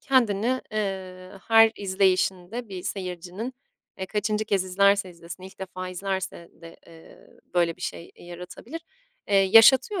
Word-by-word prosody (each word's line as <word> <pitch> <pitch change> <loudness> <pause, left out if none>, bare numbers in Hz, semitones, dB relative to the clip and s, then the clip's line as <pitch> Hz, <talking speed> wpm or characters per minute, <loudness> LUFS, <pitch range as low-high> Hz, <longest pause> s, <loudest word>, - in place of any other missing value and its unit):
kendini, 250 -2 +2
eee, 190 -3 -4 0.2
her 225 0 +7
izleyişinde 190 +3 0
bir 185 -2 -7
seyircinin, 185 +5 -5 0.5
eee, 190 - -4
kaçıncı 215 +1 -1
kez 200 -3 0
izlerse 200 +1 +2
izlesin, 170 +1 -11
ilk 190 +1 -12
defa 185 -1 -6
izlerse 190 -1 -4
de, 165 0 -12
eee, 165 -1 -16 0.3
böyle 170 -2 +2
bir 180 - -13
şey 170 - -6
yaratabilir. 180 - -9 0.5
Eee, 205 - +1
yaşatıyor 225 - +6
190 Hz, 130 wpm, -25 LUFS, 180-215 Hz, 0.5 s, her